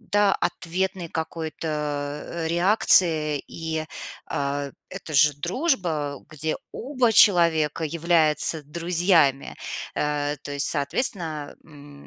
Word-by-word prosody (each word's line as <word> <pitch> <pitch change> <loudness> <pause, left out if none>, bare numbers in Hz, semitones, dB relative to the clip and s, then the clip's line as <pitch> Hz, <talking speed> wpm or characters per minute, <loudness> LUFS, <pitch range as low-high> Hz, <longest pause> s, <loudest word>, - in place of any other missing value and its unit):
да, 205 -3 +2
ответной 180 0 -2
какой-то, 160 0 -5 0.6
э, 165 -1 -4
реакции. 170 -5 +3
И, 160 -1 -4 0.4
а, 140 0 -3 0.2
это 185 -4 -8
же 150 +1 +5
дружба, 170 - -2
где 155 +1 -3 0.2
оба 255 -3 0
человека 165 -7 +4
являются 160 -1 +2
друзьями. 165 -2 +1 0.4
Э, 150 0 -1
то 145 - -6
есть, 140 0 +1
соответственно, 155 - -1
м, 145 -2 -15
160 Hz, 100 wpm, -24 LUFS, 150-175 Hz, 0.6 s, же